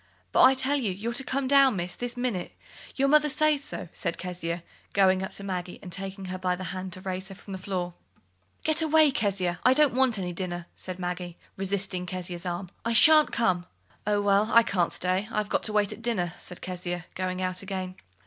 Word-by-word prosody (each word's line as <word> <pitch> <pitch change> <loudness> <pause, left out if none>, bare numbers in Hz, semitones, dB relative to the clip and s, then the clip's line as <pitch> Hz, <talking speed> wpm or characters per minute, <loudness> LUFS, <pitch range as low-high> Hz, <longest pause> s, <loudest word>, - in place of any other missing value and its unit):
"But - - +4
I 265 +1 +8
tell 265 +2 +1
you, 230 -8 0
you're 215 +6 -3
to 270 - +2
come 265 0 -1
down, 275 -3 +6
Miss, 180 -1 -3
this 245 0 -3
minute: 240 -8 -2 0.4
your 275 0 +2
mother 300 +1 +5
says 300 0 +2
so," 300 - -5
said 170 - -3
Kezia, 175 -1 -4 0.3
going 190 -2 +4
up 190 - -3
to 200 - -5
Maggie 180 -2 -4
and 180 - -8
taking 195 +1 -5
her 185 0 -5
by 180 -1 0
the 185 - -7
hand 185 0 -5
to 185 - -5
raise 185 0 -4
her 195 - -10
from 195 - -12
the 190 - -5
floor. 180 -2 -3 0.7
"Get 315 +1 +2
away, 315 -1 +5
Kezia; 195 -8 0
I 255 +1 +5
don't 295 -3 +4
want 255 -3 +3
any 180 -2 -3
dinner," 175 -1 -4
said 185 -1 -5
Maggie, 180 -1 -4 0.2
resisting 190 -2 -2
Kezia's 180 0 -5
arm. 175 +1 -4
"I 230 - 0
shan't 305 +6 +7
come." 185 -6 +1 0.4
"Oh, 205 -1 +2
well, 205 +1 +3
I 230 - +7
can't 180 -6 +1
stay. 185 +3 0
I've 210 -1 -1
got - - +1
to 215 - -2
wait 205 -1 +2
at - - -12
dinner," 195 -8 -1
said 180 - -8
Kezia, 175 -1 -4
going 185 0 -3
out 185 0 0
again. 190 -2 -4
190 Hz, 215 wpm, -27 LUFS, 180-235 Hz, 0.7 s, I